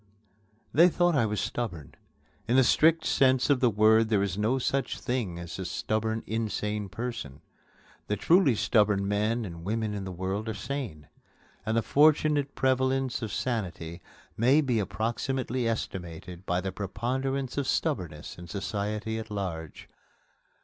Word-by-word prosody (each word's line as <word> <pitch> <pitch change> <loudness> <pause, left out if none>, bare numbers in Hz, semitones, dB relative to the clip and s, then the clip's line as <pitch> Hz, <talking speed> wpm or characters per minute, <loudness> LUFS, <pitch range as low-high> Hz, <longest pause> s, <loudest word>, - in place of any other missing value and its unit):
They 170 +4 +7
thought 175 0 +2
I 120 -6 +3
was 105 0 -2
stubborn. 90 - -4 0.5
In 120 - +2
the 130 - +6
strict 160 +5 +4
sense 130 +1 +3
of 140 - +3
the 125 -2 +4
word 110 +1 +4
there 105 -3 +3
is 95 -3 -2
no 110 +6 +1
such 135 +1 -1
thing 120 -9 -2
as 85 +1 -7
a 95 - -3
stubborn 110 +5 -1
insane 105 -2 -2
person. 115 - -5 0.7
The 105 - 0
truly 165 - +4
stubborn 105 -2 +2
men 110 +3 0
and 85 -3 -8
women 110 +2 -1
in 100 -1 -4
the 95 - -5
world 95 +5 -3
are 110 - -3
sane; 105 - -5 0.6
and 110 +1 +1
the 115 - +2
fortunate 150 -1 +3
prevalence 130 -1 +1
of 110 -3 -4
sanity 90 -9 -3 0.3
may 130 +7 +4
be 130 -7 +1
approximately 120 +4 -1
estimated 90 -4 -5
by 90 +1 +1
the 95 0 -3
preponderance 130 +7 -2
of 140 - -2
stubbornness 90 - -2
in 85 - -9
society 105 +2 -3
at 110 0 -7
large. 85 -7 -5
110 Hz, 150 wpm, -28 LUFS, 95-130 Hz, 0.7 s, They